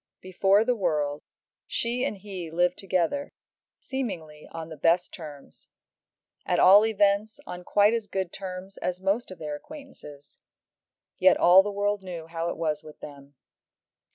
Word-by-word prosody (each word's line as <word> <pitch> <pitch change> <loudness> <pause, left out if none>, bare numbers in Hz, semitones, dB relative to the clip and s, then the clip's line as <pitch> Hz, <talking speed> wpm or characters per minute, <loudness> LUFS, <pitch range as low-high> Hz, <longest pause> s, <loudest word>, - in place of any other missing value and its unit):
Before 195 +3 +2
the 250 - +2
world 150 -8 -1 0.5
she 240 +2 -1
and 240 -6 -2
he 190 -4 -7
lived 175 +2 +1
together, 190 +9 -1 0.4
seemingly 175 - -6
on 165 -1 -7
the 160 - -8
best 165 +4 +1
terms; 150 -5 -11 0.8
at - - 0
all 200 +3 +8
events 210 0 +1
on 180 0 -7
quite 205 +4 +3
as 230 -2 -2
good 190 -3 -3
terms 190 0 -7
as 180 0 -3
most 195 +5 0
of 185 - -9
their 155 -2 -5
acquaintances; 150 - -12 0.8
yet 185 - +6
all 180 +2 +7
the 205 - -3
world 205 0 -1
knew 175 -4 -7
how 165 +1 -3
it - - -5
was 155 -2 -1
with 155 -1 -13
them. 140 -1 -12
185 Hz, 155 wpm, -26 LUFS, 165-205 Hz, 0.8 s, all